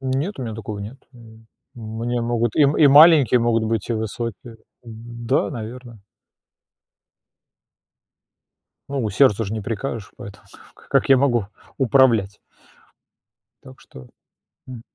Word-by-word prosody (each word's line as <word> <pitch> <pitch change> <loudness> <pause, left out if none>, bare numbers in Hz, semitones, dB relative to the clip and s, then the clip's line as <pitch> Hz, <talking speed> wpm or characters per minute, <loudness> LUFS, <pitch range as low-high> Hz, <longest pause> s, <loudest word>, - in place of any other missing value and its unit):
Нет, 135 +9 -3
у 130 - -5
меня 110 -3 -6
такого 105 -1 -7
нет. 105 +6 -8 0.2
М, 110 -2 -17 0.3
мне 115 +1 -4
могут 120 -1 -2
и 150 - +4
м 145 +1 +4
маленькие 145 -5 +6
могут 115 -1 +1
быть, 110 -2 -3
и 120 - -1
высокие. 115 +2 -6 0.3
Да, 120 +2 -3
наверно. 115 -1 -9 2.9
Ну, 135 -5 -3
сердцу 115 -5 +2
ж 100 - -6
не 110 - -4
прикажешь, 110 0 -6
поэтому 100 0 -12 0.3
ка - - -22
как - - +1
я 135 - +6
могу 120 -6 +1 0.3
управлять? 115 -6 +2 1.2
Так 65 - -15
что, 65 -1 -15 0.6
м, 125 -3 -9
115 Hz, 125 wpm, -21 LUFS, 110-130 Hz, 2.9 s, маленькие